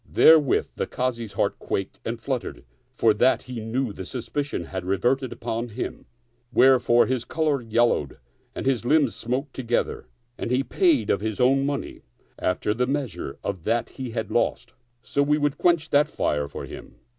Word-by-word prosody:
Therewith 155 -5 +5
the - - -1
Kazi's 120 -4 -3
heart - - 0
quaked 95 - -3
and 115 +1 -4
fluttered 125 -3 -4 0.3
for 110 -2 +3
that 120 +5 +3
he 125 -2 -6
knew 115 +1 -2
the 95 - -7
suspicion 130 +1 -3
had 95 +2 -5
reverted 120 +8 0
upon 115 +2 -3
him, 115 +2 -6 0.4
vherefore 125 -2 +5
his 130 -2 -1
color 150 -1 0
yellowed 115 - +1 0.4
and - - -4
his 130 -4 +1
limbs 140 -1 +3
smote 130 +4 -3
together; 120 - -2 0.3
and - - -3
he 125 +2 +2
paid 335 - +2
of 100 - +1
his 110 -1 -3
own 135 +2 +3
money, 140 -1 -4 0.4
after 90 +3 0
the 125 +3 0
measure 125 - -3
of 95 -4 -4
that 115 0 0
he 130 -2 -6
had 110 -2 -4
lost, 120 +1 0 0.3
so 140 - 0
we 150 +1 +3
would 145 -1 0
quench 170 -3 +2
that 145 +1 +4
fire 75 -1 -1
for - - -7
him. - - -11
125 Hz, 170 wpm, -25 LUFS, 110-135 Hz, 0.4 s, Therewith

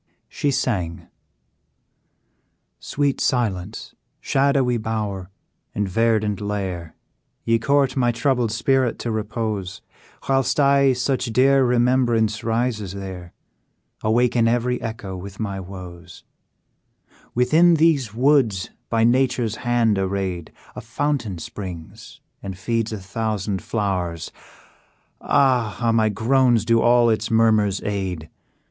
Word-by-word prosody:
She 145 - -2
sang: 100 -11 -2 1.7
"Sweet 140 -1 -1
silence, 105 -5 -2 0.3
shadowy 135 -3 +1
bower, 105 -4 -4 0.5
and 105 -1 -1
verdant 110 0 +1
lair, 95 -5 -4 0.5
Ye 115 0 +2
court 140 -1 +2
my 120 -3 +2
troubled 120 -1 0
spirit 130 +2 +1
to 120 - -4
repose, 110 -3 -4 0.4
Whilst 135 +1 +1
I, 140 -1 +4
such 130 +1 -1
dear 130 +3 +3
remembrance 120 -3 +2
rises 115 -4 -1
there, 95 -3 -8 0.7
Awaken 120 +1 +2
every 120 +1 0
echo 110 -4 -5
with 95 +1 -9
my 100 -3 -3
woes 90 -2 -10 1.1
"Within 160 +8 +4
these 155 -8 +2
woods, 120 -5 +2 0.2
by 115 -1 +2
nature's 125 -2 +1
hand 120 -4 +1
arrayed, 95 -3 -3 0.2
A 125 - -6
fountain 120 -4 -2
springs, 85 -1 -9 0.2
and 95 -2 -7
feeds 115 +3 -1
a 110 - -3
thousand 100 0 -3
flowers; 90 -6 -3 0.9
Ah! 125 -7 +2
how 120 -1 +1
my 110 -1 +3
groans 120 +1 +2
do 115 0 +3
all 120 -1 +4
its 110 +1 -1
murmurs 110 -3 +2
aid! 95 -6 -4
115 Hz, 110 wpm, -22 LUFS, 100-125 Hz, 1.7 s, I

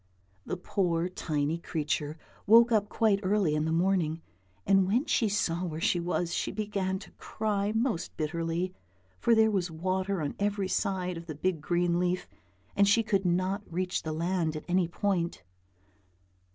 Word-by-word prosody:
The - - -2
poor, 175 -1 0
tiny 155 -3 -1
little 170 - -16
creature 150 -1 -1 0.3
woke 230 +3 +7
up 210 -2 +2
quite 215 -4 +2
early 195 -5 +2
in 150 0 0
the 160 - -1
morning, 170 -2 +1 0.4
and 195 -1 +4
when 240 +9 +2
she 225 - +2
saw 180 -4 0
where 160 -3 -4
she 175 - +2
was 175 0 -1
she - - -1
began 200 -3 -2
to 195 - -12
cry 210 -2 -1
most 225 -5 -1
bitterly, 165 +3 -2 0.5
for 230 - +4
there 220 0 +4
was 185 -3 0
water 185 +4 -1
on 145 - -2
every 200 -1 0
side 185 -3 -1
of 165 +1 -9
the 155 - -5
big 170 +1 -1
green 175 +2 +1
leaf, 180 0 0 0.5
and 200 0 +4
she 225 +3 +4
could 195 -3 0
not 185 +3 0
reach 180 +2 -1
the 160 - -4
land 165 0 -1
at 155 - -6
any 180 -1 +2
point. 175 - -1
185 Hz, 170 wpm, -29 LUFS, 165-200 Hz, 0.5 s, woke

